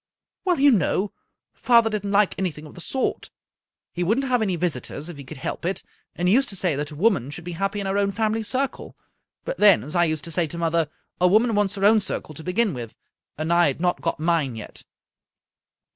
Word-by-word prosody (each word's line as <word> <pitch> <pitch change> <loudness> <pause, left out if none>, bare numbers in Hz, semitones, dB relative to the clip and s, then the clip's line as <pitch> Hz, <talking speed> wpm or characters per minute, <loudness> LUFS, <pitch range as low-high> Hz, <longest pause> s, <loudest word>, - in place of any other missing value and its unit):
" - - -61
Well, 360 -4 +2
you 285 +1 +6
know, 195 - +1 0.4
father 235 -2 +4
didn't 210 -2 -2
like 200 0 +3
an)rthing 155 -5 -3
of 150 - -12
the 175 - -11
sort. 265 +8 -2 0.6
He 175 - -2
wouldn't 225 +10 +1
have 250 -3 +1
any 195 -4 0
visitors 155 -2 -3
if 170 - -8
he 140 - -8
could 130 - -10
help 130 - -5
it, 185 +3 -2 0.3
and 175 - -1
he 185 - +4
used 270 +3 +3
to 195 - -5
say 180 -5 0
that 145 +1 -3
a 150 - -9
woman 170 - +2
should 170 +4 -8
be 175 - -6
happy 195 +4 -2
in 200 - -3
her 195 +1 0
own 200 0 +1
family 220 +2 0
circle. 260 +5 -2 0.5
But - - -4
then, 205 -4 +6
as 150 +6 -5
I 175 0 +4
used 155 -2 -2
to 165 - -6
say 170 0 +1
to 170 - -7
mother, 165 -2 +1 0.3
a 180 - +5
woman 220 +5 +4
wants 205 -1 +1
her 195 0 0
own 220 +1 +6
circle 190 -5 -4
to 160 - -9
beg^n 195 +3 +1
with, 120 -3 -7 0.4
and 155 +3 0
I 175 0 +5
had 140 - -2
not 175 0 0
got 165 - -2
mine 155 -6 +1
yet." 110 - -9
180 Hz, 235 wpm, -24 LUFS, 160-210 Hz, 0.6 s, you